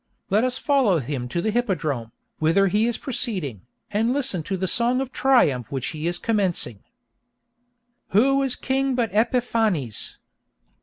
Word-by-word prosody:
Let 210 +4 +3
us 255 0 0
follow 265 - +2
him 130 -3 -3
to 170 +7 -2
the 220 - +1
hippodrome, 160 - -1 0.3
whither 165 +6 +3
he 210 +5 +2
is 240 - -1
proceeding, 180 - -3 0.2
and 220 +3 +1
listen 265 - 0
to 190 - -1
the 190 +1 -1
song 240 +5 +2
of 265 -1 -3
triumph 155 - +2
which 135 -3 -2
he 155 +1 -4
is 175 0 0
commencing: 185 - -1 1.2
Who 275 +7 +3
is 270 -2 0
king 270 0 0
but 235 -3 0
Epiphanes? 220 - 0
210 Hz, 150 wpm, -23 LUFS, 160-245 Hz, 1.2 s, Let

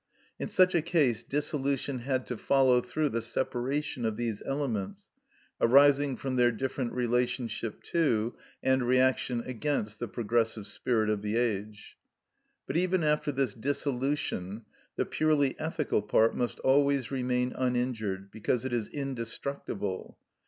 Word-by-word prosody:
In - - -2
such 185 0 +4
a 170 - +3
case 150 -8 +2
dissolution 140 -2 -1
had 130 +1 -1
to 125 - -4
follow 130 0 +4
through 145 +5 -1
the 115 -1 -1
separation 130 +3 -2
of 110 -2 -1
these 115 -3 -2
elements, 135 -8 -3 0.5
arising 140 +2 +5
from 130 -2 -3
their 120 -1 +5
different 130 +1 -3
relationship 120 -2 -1
to 120 -9 +2 0.3
and 130 0 +3
reaction 130 -1 +2
against 125 -4 -2
the 120 - -3
progressive 115 -1 -1
spirit 110 -1 0
of 105 -1 0
the 105 +1 -2
age. 105 -3 -2 0.7
But 140 - -2
even 180 0 +2
after 150 -1 +1
this 135 -5 0
dissolution 130 -5 -2 0.3
the - - 0
purely 150 -4 +2
ethical 155 -7 0
part 110 +2 +3
must 120 - -1
always 140 -1 +3
remain 125 -1 0
uninjured, 120 -6 -1
because 115 +3 -1
it 130 - -2
is 115 -3 0
indestructible. 120 -6 -4
125 Hz, 135 wpm, -29 LUFS, 115-140 Hz, 0.7 s, arising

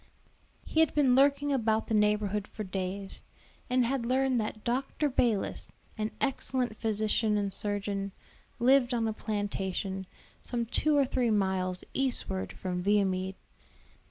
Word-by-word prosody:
He 320 - 0
had 320 - +4
been 275 -4 +4
lurking 280 +2 +4
about 220 -4 +1
the - - -3
neighborhood 210 -1 +2
for 215 - -6
days, 190 0 -4 0.5
and 250 0 +3
had 260 0 0
learned 255 0 +2
that 215 0 -5
Dr. 270 +4 0
Balis, 230 -5 0 0.2
an 215 -1 -2
excellent 260 -4 0
physician 215 0 +1
and 200 -2 -1
surgeon, 200 -1 -2 0.5
lived 250 0 +4
on 225 -1 +1
a 220 - -1
plantation, 195 -3 -3 0.3
some 235 -1 -2
two 295 +6 +2
or 280 - +5
three 250 -2 +1
miles 190 -3 0
eastward 95 - -1
from 180 - -3
Viamede. 190 -1 +1
215 Hz, 135 wpm, -30 LUFS, 195-255 Hz, 0.5 s, or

